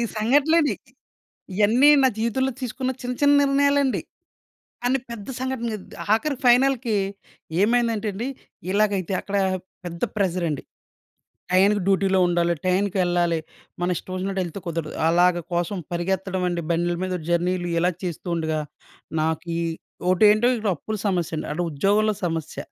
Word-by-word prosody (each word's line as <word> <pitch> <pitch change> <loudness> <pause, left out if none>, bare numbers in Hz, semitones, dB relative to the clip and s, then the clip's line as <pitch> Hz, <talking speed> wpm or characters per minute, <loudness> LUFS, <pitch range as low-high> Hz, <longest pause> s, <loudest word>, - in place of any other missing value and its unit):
సంఘటనలండి. 290 +8 +3 0.8
ఇయన్నీ 220 +8 +5
నా 265 - +6
జీవితంలో 260 +4 0
తీసుకున్న 255 +1 -2
చిన్న, 250 0 -3
చిన్న 285 0 +6
నిర్ణయాలండి. 280 -1 +2 0.8
కాని 255 +2 +2
పెద్ద 220 -2 -7
సంఘటన 260 -2 -2
అద్ - - -14 0.2
ఆఖరికి 275 +4 -2
ఫైనల్‌కి 245 -2 +4 0.7
ఏమైందంటే 230 -1 +1
అండి, 230 +7 -4 0.4
ఇలాగైతే 200 -2 +1
అక్కడ 200 - -4 0.5
పెద్ద 170 -1 -7
ప్రెషర్ 185 -4 0
అండి. 150 - -3 0.9
టయానికి 200 +2 +4
డుటిలో 195 -1 +3
ఉండాలి, 170 0 +2
టయానికి 190 +2 +1
వెళ్ళాలి, 175 -2 +1 0.4
మన 180 0 +1
ఇష్టమొచ్చినట్టు 190 +1 -3
వెళ్తే 175 +3 -6
కుదరదు. 165 -2 -3 0.2
అలాగ 175 +1 +4 0.2
కోసం 175 +3 -1
పరిగెత్తడం 185 +1 -1
అండి. 175 -1 -2
బండ్ల 175 +1 0
మీద 185 -1 -2
జర్నీలు 175 +1 0
ఇలా 180 +2 +2
చేస్తూ 175 -1 -5
ఉండగా, 160 -1 -1 0.6
నాకీ 160 +1 -2 0.5
ఒకటేంటో 210 +5 +5 0.3
అప్పుల 215 +8 -5
సమస్య 180 -4 0
అండి, - - -4
అటు 175 +3 -1
ఉద్యోగంలో 205 +7 +2
సమస్య, 165 -2 -3
195 Hz, 125 wpm, -23 LUFS, 175-235 Hz, 0.9 s, నా